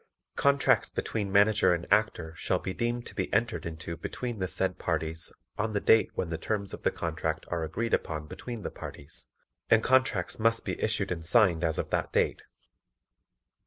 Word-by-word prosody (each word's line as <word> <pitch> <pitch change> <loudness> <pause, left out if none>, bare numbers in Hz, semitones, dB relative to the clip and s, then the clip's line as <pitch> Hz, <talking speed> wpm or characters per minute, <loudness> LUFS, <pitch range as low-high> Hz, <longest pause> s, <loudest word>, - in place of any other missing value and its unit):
Contracts 140 0 +3
between 100 -3 -3
Manager 100 -2 +5
and 85 - -6
Actor 90 -7 +1
shall - - 0
be 95 - -4
deemed 120 +2 -2
to - - -9
be - - -3
entered 115 -6 0
into 85 +1 -6
between 120 +6 -5
the 95 - 0
said 95 +2 +1
parties 80 -1 -1 0.3
on 110 +1 0
the 100 - +1
date 110 +2 +5
when 90 - -2
the 80 - -3
terms 100 +1 -2
of - - -7
the - - +2
contract 80 -1 -3
are 85 -2 -1
agreed 115 +9 -2
upon 75 -1 -1
between 115 +7 -7
the - - -4
parties, 70 - -7 0.4
and 110 -1 +5
contracts 130 -9 +2
must 115 +1 +2
be - - -3
issued 105 -3 0
and 85 -2 -3
signed 85 -1 +4
as 80 -1 +1
of - - -3
that - - 0
date. - - +1
95 Hz, 185 wpm, -29 LUFS, 80-110 Hz, 0.4 s, Manager